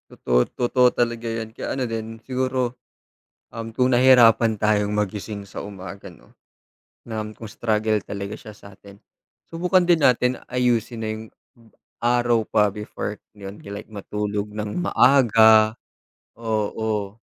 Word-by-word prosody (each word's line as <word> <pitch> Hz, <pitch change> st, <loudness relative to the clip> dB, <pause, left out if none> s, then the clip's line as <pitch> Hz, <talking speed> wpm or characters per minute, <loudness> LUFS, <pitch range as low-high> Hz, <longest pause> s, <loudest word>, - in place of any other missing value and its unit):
Totoo, 60 Hz, 0 st, +1 dB
totoo 125 Hz, +1 st, +2 dB
talaga 120 Hz, -1 st, -1 dB
yan 115 Hz, -1 st, -5 dB
kaya 130 Hz, -, -4 dB
ano 130 Hz, -, -1 dB
din 115 Hz, -1 st, -5 dB
siguro 130 Hz, -1 st, -1 dB, 0.8 s
um, 115 Hz, 0 st, -6 dB
kung 125 Hz, +3 st, +1 dB
nahirapan 120 Hz, -3 st, +6 dB
tayong 105 Hz, 0 st, +1 dB
magising 105 Hz, 0 st, -3 dB
sa 100 Hz, -, -8 dB
umaga 100 Hz, -1 st, -9 dB
'no. 85 Hz, -, -19 dB, 0.7 s
Na 110 Hz, -2 st, -3 dB
kung 115 Hz, -, -8 dB
struggle 110 Hz, -1 st, 0 dB
talaga 100 Hz, 0 st, -6 dB
siya 110 Hz, -, -11 dB
sa 100 Hz, 0 st, -14 dB
atin, 100 Hz, +1 st, -16 dB, 0.5 s
subukan 180 Hz, +2 st, +1 dB
din 170 Hz, -2 st, +3 dB
natin 125 Hz, 0 st, +3 dB
ayusin 120 Hz, -2 st, 0 dB
na -, -, -2 dB
yung 110 Hz, +1 st, -8 dB, 0.8 s
araw 120 Hz, -1 st, +2 dB
pa 105 Hz, 0 st, +2 dB
before 105 Hz, 0 st, -5 dB, 0.2 s
like 100 Hz, +1 st, -9 dB
matulog 105 Hz, 0 st, -4 dB
ng 105 Hz, +8 st, -4 dB
maaga 110 Hz, -7 st, +5 dB, 0.6 s
oo. 110 Hz, -2 st, -2 dB
110 Hz, 130 wpm, -23 LUFS, 105-120 Hz, 0.8 s, nahirapan